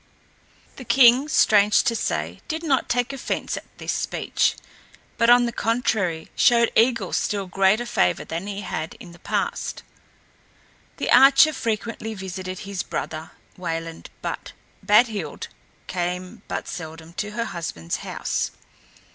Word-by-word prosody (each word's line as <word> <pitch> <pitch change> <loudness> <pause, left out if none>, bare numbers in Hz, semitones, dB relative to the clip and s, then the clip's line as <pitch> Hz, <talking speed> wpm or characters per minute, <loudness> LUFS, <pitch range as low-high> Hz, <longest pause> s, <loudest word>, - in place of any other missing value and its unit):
The 260 - -8
king, 255 +2 +6
strange 210 -7 +4
to 230 - +1
say, - - -2
did 325 -1 -3
not 275 -6 +1
take 245 +2 0
offense 270 - -3
at - - -7
this - - -3
speech, - - 0 0.6
but 230 0 +3
on 245 0 +7
the 235 - -1
contrary 215 -9 -1
showed 235 -1 +4
Eigil 230 -4 +2
still 200 -2 0
greater 195 +5 +2
favor 90 - +1
than 170 +4 -5
he 205 0 -4
had 160 -4 -4
in 185 -8 -12
the 170 - -15
past. - - -3 1.1
The - - -2
archer 275 +4 +7
frequently 225 -2 -3
visited 185 -1 -6
his 195 -2 -4
brother 155 +1 -5 0.3
Wayland, 165 -2 -5
but - - -5 0.3
Badhild 215 0 +2 0.4
came 180 0 -4
but - - -4
seldom 160 -2 -8
to 210 0 -3
her 230 +1 -2
husband's 115 - -4
house. - - -2
210 Hz, 135 wpm, -23 LUFS, 180-235 Hz, 1.1 s, on